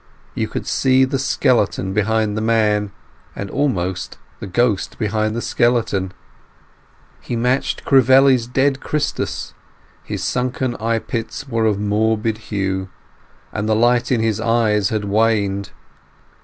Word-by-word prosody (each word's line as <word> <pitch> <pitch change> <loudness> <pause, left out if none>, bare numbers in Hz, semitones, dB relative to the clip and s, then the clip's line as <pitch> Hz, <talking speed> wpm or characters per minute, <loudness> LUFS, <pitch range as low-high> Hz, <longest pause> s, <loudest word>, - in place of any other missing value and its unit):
You - - -2
could - - -5
see 130 0 +3
the 135 +1 -2
skeleton 105 -7 +1
behind 105 0 +1
the 110 - -2
man, 105 -2 +1 0.4
and 100 - -6
almost 95 -10 -2 0.2
the - - -6
ghost 105 +1 0
behind 110 0 -1
the 120 - -3
skeleton. 115 -6 +1 1.1
He 120 - -5
matched 125 +3 0
Crivelli's 130 -2 +5
dead 135 +2 +1
Christus. 150 +1 -3 0.5
His 100 -4 -5
sunken 125 +5 -1
eye 115 +1 0
pits 115 +5 -5
were 115 -3 0
of 105 -2 0
morbid 110 +1 0
hue, 95 -2 -2 0.6
and 110 0 -2
the 110 - +3
light 120 +2 +2
in 120 -3 +2
his 110 -2 0
eyes 110 -4 +2
had 110 -2 -2
waned. 100 -2 +1
110 Hz, 130 wpm, -19 LUFS, 105-125 Hz, 1.1 s, Crivelli's